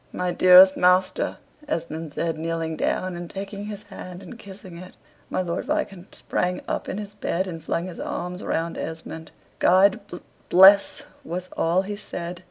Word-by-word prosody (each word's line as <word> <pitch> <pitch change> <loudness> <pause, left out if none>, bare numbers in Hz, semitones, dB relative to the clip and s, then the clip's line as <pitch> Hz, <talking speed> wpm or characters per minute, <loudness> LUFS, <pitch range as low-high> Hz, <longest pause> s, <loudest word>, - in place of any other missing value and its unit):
"My 180 0 -2
dearest 185 +1 +8
master!" 180 +1 +2 0.3
Esmond 160 -2 -4
said, 165 +1 -2
kneeling 165 0 -3
down, 185 +3 -1
and 175 -1 -7
taking 200 +1 -6
his 210 0 -7
hand 185 -2 -10
and 235 - -11
kissing 190 -4 -11
it. 185 +1 -12 0.3
My 185 - -1
Lord 170 -1 -3
Viscount 190 -1 -3
sprang 180 0 -2
up - - -3
in - - -4
his 205 -1 -7
bed, 190 -2 -2
and 165 -4 -7
flung 170 +1 -2
his 185 -2 -8
arms 180 +1 -5
round 165 +1 -2
Esmond. 160 0 -7 0.3
"God 190 +3 +5
bl 195 - -8 0.3
bless 195 +2 +6
" - - -30
was 180 +1 -4
all 175 +3 +1
he 205 +1 -5
said. 175 -4 -6
180 Hz, 175 wpm, -24 LUFS, 170-195 Hz, 0.3 s, dearest